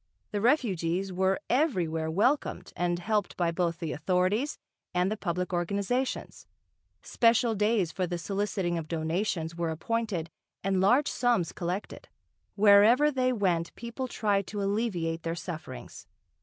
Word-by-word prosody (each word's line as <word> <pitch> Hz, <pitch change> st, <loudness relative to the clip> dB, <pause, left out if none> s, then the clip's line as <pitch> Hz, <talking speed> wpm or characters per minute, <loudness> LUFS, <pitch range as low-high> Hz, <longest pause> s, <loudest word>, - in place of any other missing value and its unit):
The 205 Hz, -, -1 dB
refugees 195 Hz, -, +1 dB
were 190 Hz, +1 st, +1 dB
everywhere 175 Hz, -, +1 dB
welcomed 235 Hz, -, 0 dB
and 175 Hz, 0 st, 0 dB
helped 205 Hz, +1 st, -1 dB
by 170 Hz, -2 st, +1 dB
both 170 Hz, -1 st, -1 dB
the 165 Hz, -3 st, -4 dB
authorities 185 Hz, -, 0 dB, 0.4 s
and 180 Hz, +2 st, +2 dB
the -, -, 0 dB
public 180 Hz, -2 st, -3 dB
organisations. 200 Hz, +9 st, -2 dB, 0.6 s
Special 230 Hz, 0 st, +3 dB
days 210 Hz, -4 st, +1 dB
for 185 Hz, -2 st, -2 dB
the 175 Hz, 0 st, -3 dB
soliciting 195 Hz, -2 st, -1 dB
of 155 Hz, -, -7 dB
donations 165 Hz, +1 st, -2 dB
were 170 Hz, -1 st, -1 dB
appointed 180 Hz, -1 st, -2 dB, 0.3 s
and 190 Hz, -1 st, +1 dB
large 245 Hz, +9 st, +4 dB
sums 235 Hz, -9 st, +1 dB
collected. 180 Hz, +3 st, -5 dB, 0.5 s
Wherever 215 Hz, +8 st, +6 dB
they 255 Hz, -2 st, +1 dB
went 180 Hz, -7 st, 0 dB
people 235 Hz, +3 st, -5 dB
tried 205 Hz, -5 st, 0 dB
to 205 Hz, -1 st, -3 dB
alleviate 195 Hz, -6 st, -1 dB
their 165 Hz, 0 st, -3 dB
sufferings. 165 Hz, -, -8 dB
190 Hz, 135 wpm, -29 LUFS, 170-225 Hz, 0.6 s, Wherever